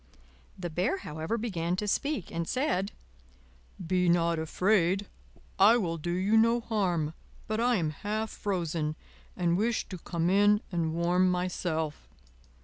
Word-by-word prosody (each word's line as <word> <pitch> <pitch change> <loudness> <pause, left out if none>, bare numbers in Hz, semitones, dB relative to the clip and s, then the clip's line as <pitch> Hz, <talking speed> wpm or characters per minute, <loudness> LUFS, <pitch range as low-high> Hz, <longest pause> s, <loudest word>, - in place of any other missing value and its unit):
The 175 -2 -5
Bear, 180 - 0
however, 160 - -4
began 180 -7 -2
to 210 +3 -3
speak, 280 - -1
and 165 0 -3
said: 255 -8 0 0.9
"Be 180 0 +1
not 170 -1 +2
afraid, 185 +3 +2 0.5
I 215 +5 +7
will 165 -7 -2
do 175 - -4
you 195 +5 +2
no 230 +2 +4
harm; 180 -9 0 0.3
but 215 +1 -1
I 245 +1 +3
am 160 -6 0
half 215 +7 -3
frozen, 165 -6 -2 0.4
and 175 -1 +2
wish 225 +3 0
to 185 - -6
come 170 0 -2
in 205 +2 +4
and 165 -2 -1
warm 175 +2 +3
myself." 175 -4 -2
180 Hz, 140 wpm, -29 LUFS, 170-210 Hz, 0.9 s, I